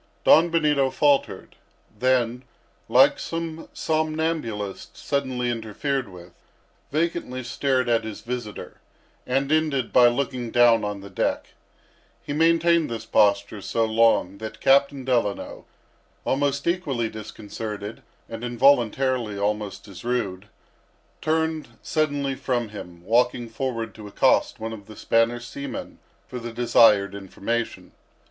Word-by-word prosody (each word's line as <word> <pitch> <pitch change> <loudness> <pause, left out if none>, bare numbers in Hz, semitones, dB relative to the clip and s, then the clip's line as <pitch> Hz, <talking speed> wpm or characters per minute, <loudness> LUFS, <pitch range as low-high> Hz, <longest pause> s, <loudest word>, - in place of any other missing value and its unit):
Don 165 +2 +6
Benito 150 -5 +2
faltered; 145 0 +1 0.4
then, 125 +1 +1 0.5
like - - +5
some 165 -1 -5
somnambulist 155 -10 -2
suddenly 130 -3 -1
interfered 120 +3 -3
with, 90 -1 -13 0.6
vacantly 155 -4 -2
stared 130 +1 0
at 115 -1 +2
his 110 -1 -7
visitor, 120 -3 -6 0.5
and 135 +3 0
ended 155 -6 +1
by 125 -1 +7
looking 125 -1 -1
down 120 -1 +5
on 105 -1 -3
the 100 - -10
deck. - - -1 0.7
He 145 - -4
maintained 165 +1 +3
this 115 -1 -5
posture 100 0 +2
so 115 +3 0
long, 110 -4 +2
that 110 0 -7
Captain 140 0 +3
Delano, 120 -6 -1 0.6
almost 140 +1 0
equally 150 -10 0
disconcerted, 110 0 -7 0.3
and 115 +1 -7
involuntarily 120 -2 +2
almost 105 0 -2
as 100 -3 -11
rude, 105 -5 -2 0.7
turned 160 -6 -1
suddenly 145 -3 0
from 120 -4 -2
him, 90 -4 -10
walking 120 +3 +2
forward 115 -1 -3
to 105 -1 -10
accost 100 - +2
one 110 0 -4
of 105 -2 -10
the 110 - -11
Spanish 115 +3 +1
seamen 140 0 -7 0.3
for 125 - -6
the 120 0 -6
desired 115 -4 +4
information. 100 +4 -4
120 Hz, 120 wpm, -24 LUFS, 110-140 Hz, 0.7 s, by